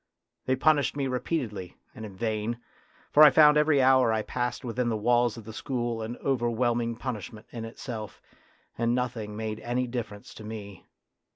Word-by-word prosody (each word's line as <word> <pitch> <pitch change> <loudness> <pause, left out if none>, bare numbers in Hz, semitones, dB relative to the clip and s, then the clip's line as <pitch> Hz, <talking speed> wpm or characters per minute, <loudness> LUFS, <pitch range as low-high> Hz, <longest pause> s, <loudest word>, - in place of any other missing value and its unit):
They 130 - +3
punished 145 +1 +2
me 140 - 0
re 130 -1 -1
peatedly 105 - -3 0.2
and 110 -4 -7
in 100 - -12
vain, 110 +2 -2 0.5
for 150 - +6
I 155 - +11
found 150 +1 +6
every 150 -2 +4
hour 130 -3 +5
I 110 -1 0
passed 125 +2 -3
within 120 0 -1
the 110 - 0
walls 120 +1 +2
of 115 - -8
the 110 - -8
school 120 -2 -3
an 110 +2 -5
over 125 -4 +1
whelming 120 0 0
punishment 110 -2 -6
in 115 -2 -6
itself, 115 -3 -7 0.6
and 120 0 +2
nothing 115 -4 -3
made 110 -1 -4
any 120 +2 -1
difference 115 -4 -6
to 110 - -11
me. 105 -3 -8
120 Hz, 180 wpm, -28 LUFS, 110-125 Hz, 0.6 s, I